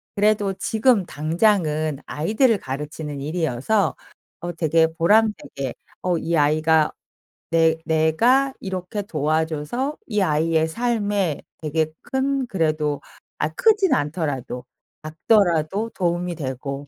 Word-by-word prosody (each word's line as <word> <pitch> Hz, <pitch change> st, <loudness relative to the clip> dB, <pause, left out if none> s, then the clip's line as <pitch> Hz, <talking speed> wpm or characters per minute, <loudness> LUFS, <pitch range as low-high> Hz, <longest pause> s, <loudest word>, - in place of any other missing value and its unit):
그래도 205 Hz, -1 st, +2 dB
지금 220 Hz, +1 st, +2 dB
당장은 155 Hz, -3 st, +1 dB
아이들을 220 Hz, -, +2 dB
가르치는 150 Hz, +1 st, -5 dB
일이어서 160 Hz, -, 0 dB, 0.4 s
어 175 Hz, -, -4 dB
되게 160 Hz, 0 st, +3 dB
보람되게 165 Hz, -, +1 dB, 0.3 s
어 180 Hz, -2 st, +1 dB
이 170 Hz, +1 st, -1 dB
아이가 155 Hz, +1 st, +3 dB, 0.6 s
내 165 Hz, -1 st, +4 dB
내가 225 Hz, -, +3 dB
이렇게 190 Hz, +2 st, -4 dB
도와줘서 160 Hz, -, -1 dB
이 210 Hz, -3 st, 0 dB
아이의 160 Hz, -1 st, +2 dB
삶에 205 Hz, -, -1 dB, 0.2 s
되게 155 Hz, 0 st, 0 dB
큰 270 Hz, 0 st, -1 dB
그래도 155 Hz, -7 st, 0 dB, 0.4 s
아 150 Hz, -, +1 dB
크지는 390 Hz, -, +3 dB
않더라도 145 Hz, -5 st, -3 dB, 0.4 s
작더라도 175 Hz, +4 st, +1 dB
도움이 175 Hz, -1 st, -1 dB
되고 140 Hz, 0 st, -5 dB
165 Hz, 255 characters per minute, -22 LUFS, 155-210 Hz, 0.6 s, 내